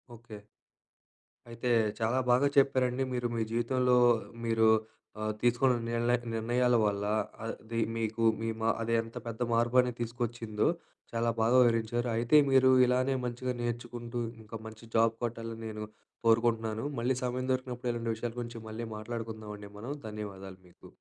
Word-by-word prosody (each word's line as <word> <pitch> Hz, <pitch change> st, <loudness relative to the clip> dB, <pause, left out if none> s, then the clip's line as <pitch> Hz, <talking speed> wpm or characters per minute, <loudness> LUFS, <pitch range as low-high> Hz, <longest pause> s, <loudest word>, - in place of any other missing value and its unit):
Okay. 110 Hz, -2 st, -11 dB, 1.1 s
అయితే, 115 Hz, +1 st, -3 dB, 0.3 s
చాలా 115 Hz, +4 st, +1 dB
బాగా 130 Hz, +4 st, +4 dB
చెప్పారండి 130 Hz, -2 st, +3 dB
మీరు. 120 Hz, -1 st, 0 dB
మీ 115 Hz, -, +1 dB
జీవితంలో 125 Hz, +1 st, +2 dB, 0.5 s
మీరు 115 Hz, -1 st, +4 dB, 0.5 s
ఆహ్, 110 Hz, 0 st, 0 dB
తీసుకున్న 120 Hz, +1 st, +3 dB
నిల్నె 120 Hz, +1 st, +2 dB, 0.2 s
నిర్ణయాల 120 Hz, +2 st, +2 dB
వల్ల 100 Hz, -1 st, 0 dB, 0.4 s
అది, 115 Hz, 0 st, -4 dB, 0.2 s
మీకు 115 Hz, 0 st, -2 dB, 0.2 s
మీ 115 Hz, -, -1 dB
మా 115 Hz, -, +2 dB
అది 115 Hz, 0 st, -1 dB
ఎంత 115 Hz, 0 st, -11 dB
పెద్ద 115 Hz, 0 st, -6 dB
మార్పనేది 120 Hz, +1 st, +3 dB
తీసుకొచ్చిందో, 115 Hz, -2 st, -2 dB, 0.4 s
చాలా 115 Hz, 0 st, 0 dB
బాగా 120 Hz, +3 st, +4 dB
వివరించారు. 120 Hz, +1 st, +1 dB
అయితే, 120 Hz, +6 st, +2 dB, 0.2 s
మీరు 130 Hz, 0 st, +6 dB, 0.2 s
ఇలానే 130 Hz, +2 st, +2 dB
మంచిగా 125 Hz, +1 st, -2 dB
నేర్చుకుంటూ, 120 Hz, 0 st, -4 dB, 0.2 s
ఇంక 110 Hz, +1 st, -8 dB
మంచి 110 Hz, +1 st, -11 dB
జాబ్ 115 Hz, 0 st, +4 dB
కొట్టాలని, 115 Hz, -1 st, -4 dB
నేను 105 Hz, -1 st, -5 dB, 0.4 s
కోరుకుంటున్నాను. 115 Hz, 0 st, +2 dB
మళ్ళీ 125 Hz, +2 st, +1 dB
సమయం 125 Hz, +1 st, -2 dB
దొరికినప్పుడు, 125 Hz, -1 st, -3 dB
ఇలాంటి 115 Hz, -1 st, -2 dB
విషయాల 115 Hz, +1 st, -5 dB
గురించి 120 Hz, -1 st, -6 dB
మళ్ళీ 115 Hz, +2 st, -5 dB
మాట్లాడుకుందావండి 110 Hz, -2 st, -6 dB
మనం. 125 Hz, +7 st, -4 dB
ధన్యవాదాలు 100 Hz, -3 st, -7 dB
మీకు. -, -, -17 dB
115 Hz, 135 wpm, -30 LUFS, 110-125 Hz, 1.1 s, మీరు